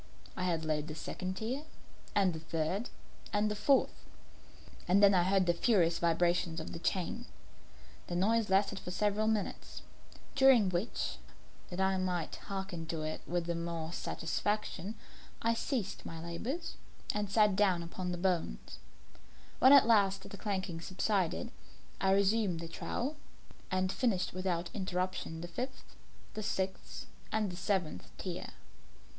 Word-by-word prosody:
I 180 -2 +1
laid 155 -2 -1
the 155 - -6
second 185 +3 -4
tier, 245 +7 -2 0.5
and 195 -3 +4
the 160 - -5
third, 165 +7 -2 0.4
and 210 +1 +2
the - - -1
fourth; 265 +6 +3 0.9
and 195 +3 +5
then 200 0 +8
I 180 - +5
heard 190 +1 +3
the 175 - +3
furious 170 -4 +3
vibrations 170 0 +2
of - - -6
the 165 - -5
chain. 190 +7 -1 0.8
The 175 - -3
noise 215 +4 +2
lasted 195 +1 +3
for - - -7
several 210 +3 +1
minutes, 220 -2 -2 0.5
during 265 -7 +6
which, 185 +5 -2 0.5
that 180 - -6
I 190 0 +3
might 180 -3 -1
hearken 190 -4 -5
to 160 -1 -3
it 155 0 -3
with 175 0 0
the 170 - -1
more 170 -1 -3
satisfaction, 205 +5 -2 0.4
I 230 0 +2
ceased 230 -3 -2
my 165 - -6
labours 220 - -4 0.4
and 210 -1 -1
sat 210 -1 +4
down 190 -4 +3
upon 180 +2 -4
the 175 - -2
bones. 170 - -1 0.8
When 260 - +8
at 280 -4 +9
last 200 -4 +3
the - - -8
clanking 190 -5 -3
subsided, 185 0 0 0.5
I 190 - +2
resumed 200 -2 +2
the 165 - -5
trowel, 265 - -3 0.5
and 185 0 +1
finished 210 -8 0
without 180 -2 -1
interruption 185 -4 -2
the 175 - -5
fifth, 255 +8 -6 0.4
the 215 - -4
sixth, 190 -2 -3 0.3
and 215 -3 +1
the - - -6
seventh 180 - -1
tier. - - -5
185 Hz, 145 wpm, -33 LUFS, 170-210 Hz, 0.9 s, at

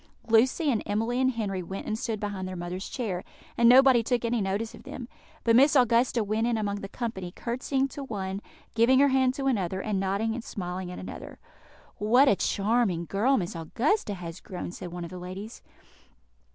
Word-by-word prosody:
Lucy 255 +7 +3
and 225 - 0
Emily 225 +5 0
and 260 0 +2
Henry 200 -5 -2
went 190 +3 -6
and 215 - -1
stood 225 -2 -3
behind 200 -3 -4
their 185 - -5
mother's 180 +2 -5
chair, 205 -8 -3 0.3
and 235 0 +5
nobody 260 -1 +7
took 240 +1 0
any 230 -1 0
notice 200 +4 -2
of 230 - -12
them; 245 0 -8 0.4
but 230 -1 +4
Miss 280 +5 +6
Augusta 240 -2 +3
went 215 +3 0
in 235 -1 +1
among 205 -2 -1
the 195 -1 -7
company, 195 -8 -4
curtseying 260 +6 -1
to 280 - -7
one, 195 -5 -4 0.3
giving 235 +3 +4
her 280 +1 +5
hand 260 -1 +2
to 275 - -3
another, 190 -8 0
and 200 -1 -1
nodding 200 +4 0
and 240 0 -5
smiling 180 -3 -5
at 180 - -7
another. - - -8 0.6
"What 245 +7 +4
a 205 - +5
charming 200 -4 +1
girl 235 +10 +2
Miss 175 -4 -3
Augusta 220 - 0
has 170 -1 -7
grown!" 180 -2 -6
said 175 -1 -8
one 175 0 -5
of 170 - -7
the 180 - -7
ladies. 190 +5 -8
220 Hz, 195 wpm, -27 LUFS, 190-245 Hz, 0.6 s, nobody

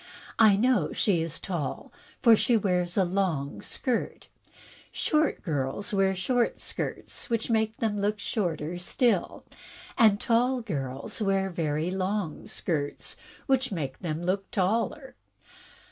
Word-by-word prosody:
I 215 -3 +7
know 245 +5 +2
she 185 -6 +2
is 165 0 -4
tall, 165 -8 -4 0.3
for 230 -3 +8
she 235 +2 +3
wears 180 -3 0
a 195 - +5
long 175 -7 -1
skirt. 250 -3 -3 0.6
Short 310 -1 +1
girls 155 - -2
wear 195 -1 +3
short 240 +6 0
skirts, - - -4
which 230 0 0
make 220 -1 +1
them 210 -3 -1
look 210 +1 +1
shorter 175 -5 -2
still, 205 +2 0 0.5
and 215 -3 +6
tall 245 +2 +2
girls 140 - -4
wear 195 -1 +1
very 160 0 -1
long 190 -3 -2
skirts, 145 -4 -3 0.3
which 265 -2 +2
make 140 -8 -4
them 165 -1 -3
look 190 +2 -1
taller." 220 - 0
195 Hz, 130 wpm, -28 LUFS, 170-225 Hz, 0.6 s, for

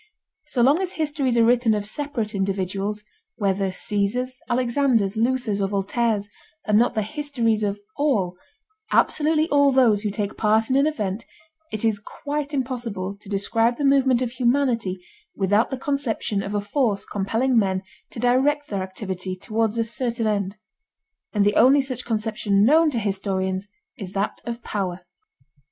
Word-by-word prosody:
So 245 - +1
long 285 +8 +4
as 375 -1 -3
histories 290 -6 0
are 230 - +5
written 240 -2 +3
of 205 -1 -2
separate 235 -2 -3
individuals, 195 +1 -2 0.3
whether 195 -2 0
Caesars, 230 +6 -1
Alexanders, 240 -4 +1
Luthers, 230 -3 0
or 195 - +1
Voltaires, 205 +2 0 0.4
and 210 -1 +4
not 240 - +2
the 215 - +1
histories 235 -3 -1
of 205 -1 -1 0.2
all, 210 -12 +1 0.6
absolutely 310 +1 +3
all 285 -1 +4
those 240 -6 +4
who 210 - -1
take 205 0 -3
part 220 +2 +2
in - - +3
an 280 +2 +4
event, 215 -8 -2 0.5
it 215 +1 -1
is 215 -2 +2
quite 290 +6 -4
impossible 235 -8 -3
to 200 - -13
describe 225 +4 +1
the 285 - -1
movement 265 -2 +4
of 240 - -3
humanity 240 -7 0 0.3
without 205 +3 +2
the 265 - -3
conception 255 -7 -1
of 195 +1 -4
a 205 - +1
force 205 -1 0
compelling 225 +6 0
men 190 -4 +2 0.3
to - - -8
direct 270 +5 +2
their 200 -2 -2
activity 185 -1 -4
toward 220 +3 -1
a 230 - +2
certain 230 +1 -2
end. 205 -1 -1 0.7
And 205 -2 +2
the 205 - +3
only 265 +5 +6
such 260 -2 -3
conception 215 -3 +1
known 315 +5 +5
to 265 - -3
historians 190 -2 -1 0.3
is 190 -2 -6
that 200 +1 -2
of 235 0 -5
power. 185 -3 -3
225 Hz, 160 wpm, -23 LUFS, 200-255 Hz, 0.7 s, only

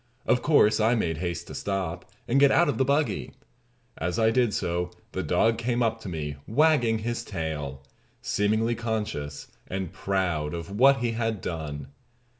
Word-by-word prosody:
Of 125 - +3
course, 130 -9 +4
I 110 +3 +3
made 80 -8 -1
haste 85 0 -3
to - - -10
stop, 95 -3 -3 0.2
and 135 +4 +3
get 140 0 +7
out 175 +4 +4
of 145 - -1
the - - +5
buggy. 140 +3 0 0.7
As 85 +1 -1
I 110 0 +4
did 120 -2 +2
so 90 -2 -1 0.2
the - - -2
dog 115 0 +2
came 120 +1 0
up 115 0 0
to 100 - -6
me 75 -4 -4
wagging 125 -3 +3
his 120 0 -2
tail, 75 - -4 0.4
seemingly 110 +3 +1
conscious 105 -11 -4 0.2
and 95 -2 -4
proud 90 -6 -1
of 85 +2 -6
what 135 +5 +5
he 120 -1 +1
had 115 -2 -1
done. 75 -6 -5
105 Hz, 170 wpm, -27 LUFS, 85-120 Hz, 0.7 s, get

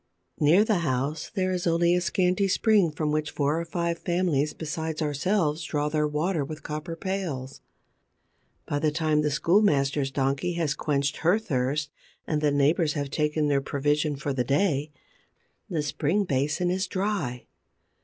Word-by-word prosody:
Near 160 +7 +5
the 215 -5 +2
house 145 0 -2
there 185 -2 0
is 180 -1 -1
only 170 +1 +3
a 180 - +2
scanty 185 +2 +1
spring 205 -2 +3
from 150 0 -2
which 155 0 -1
four 150 +3 0
or - - -5
five 170 0 -2
families 170 -5 0
besides 160 0 -4
ourselves 155 +1 0
draw 150 -1 -1
their 150 0 +1
water 155 +2 0
with 155 +2 -7
copper 155 +2 -5
pails. 165 -8 -4 1.0
By 145 - -1
the 155 - +2
time 155 -1 +1
that 150 - 0
the 145 - 0
schoolmasters 150 -7 +2
donkey 135 +5 -1
has 165 -5 0
quenched 140 0 -1
her 175 +6 +3
thirst 145 - -1 0.3
and 150 -1 -1
the 150 - +3
neighbors 150 +3 +2
have 145 -2 -3
taken 150 0 0
their 140 -1 +2
provision 145 +2 0
for 140 0 -3
the 130 -2 0
day, 145 +2 +1 0.8
the 160 -4 -1
spring 155 +7 0
basin 150 +3 0
is 190 +2 -1
dry. 185 - -2
155 Hz, 165 wpm, -26 LUFS, 145-175 Hz, 1.0 s, Near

